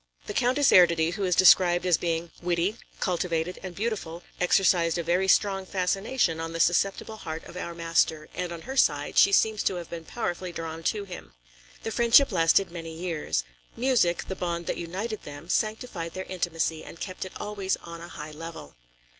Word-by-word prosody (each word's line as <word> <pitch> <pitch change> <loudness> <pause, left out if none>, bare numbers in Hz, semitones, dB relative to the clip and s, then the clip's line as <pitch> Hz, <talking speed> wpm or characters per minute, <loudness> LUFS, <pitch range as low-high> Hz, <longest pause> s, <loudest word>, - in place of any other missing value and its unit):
The - - -5
Countess 255 +5 +3
Erdödy, 170 -2 +5
who 200 0 -2
is 180 -2 +2
described 180 -1 +6
as 180 -3 +3
being 165 -1 -2
witty, 175 +5 0 0.2
cultivated 175 -2 -1
and 185 -2 -7
beautiful, 195 -6 -3 0.2
exercised 180 -2 +3
a 170 - -1
very 180 +3 +1
strong 195 0 +3
fascination 190 0 0
on 165 0 -4
the 165 - -4
susceptible 195 +6 +1
heart 160 -4 -6
of 170 - -12
our 170 -1 -5
master, 165 -2 +1
and 180 -1 -3
on 170 -1 -7
her 265 +7 -7
side, 145 - +2
she 200 - +6
seems 215 +1 +3
to 190 - 0
have 175 -2 -7
been 170 -1 -6
powerfully 180 -5 -4
drawn 165 -1 -6
to 210 -2 0
him. 175 - -10 0.5
The 225 - -3
friendship 235 +4 +5
lasted 170 +1 +3
many 165 -2 -7
years. 165 - -2 0.3
Music, 235 -9 +2
the 190 - -4
bond 170 -1 -3
that - - -2
united 195 +6 -4
them, 145 +4 -10
sanctified 215 -7 -2
their 185 0 -4
intimacy 165 -3 -2
and 165 - -11
kept 185 -2 -5
it 185 - -8
always 200 -2 -2
on 170 0 -9
a 170 - -8
high 150 -2 -8
level. 160 - -9
175 Hz, 185 wpm, -27 LUFS, 165-195 Hz, 0.5 s, described